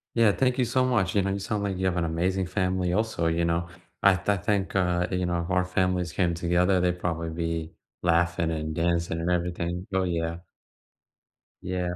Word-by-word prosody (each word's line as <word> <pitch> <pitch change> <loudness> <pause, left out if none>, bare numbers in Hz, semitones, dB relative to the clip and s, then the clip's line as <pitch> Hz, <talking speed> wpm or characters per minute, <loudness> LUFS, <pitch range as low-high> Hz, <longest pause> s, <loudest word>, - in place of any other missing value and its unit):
Yeah, 115 -3 +5
thank 130 +3 +1
you 125 - +3
so 130 +2 +1
much, 105 -7 +1
you 100 - +3
know, 95 - 0
you 100 - -2
sound 100 +1 -2
like 100 -2 -1
you 95 +1 0
have 90 -1 0
an 85 - +1
amazing 90 +3 0
family 90 -1 0
also, 110 -5 0
you 85 +1 +1
know? 85 0 0 0.4
I 100 - +8 0.2
I 100 -1 +3
think, 95 -1 -1
uh, 90 -1 +2
you 90 -1 -1
know, 85 -1 0
if 85 - -7
our 90 0 +2
families 90 -2 0
came 85 -3 +1
together, 90 +2 +2
they'd 90 0 0
probably 85 -1 -2
be 85 -1 -3 0.3
laughing 85 -1 +2
and 80 -1 -3
dancing 85 0 0
and 85 +2 -1
everything. 90 +1 -2
Oh, 95 0 +1
yeah. 85 -1 -2 1.2
Yeah. 90 -1 -2
90 Hz, 200 wpm, -26 LUFS, 85-95 Hz, 1.2 s, I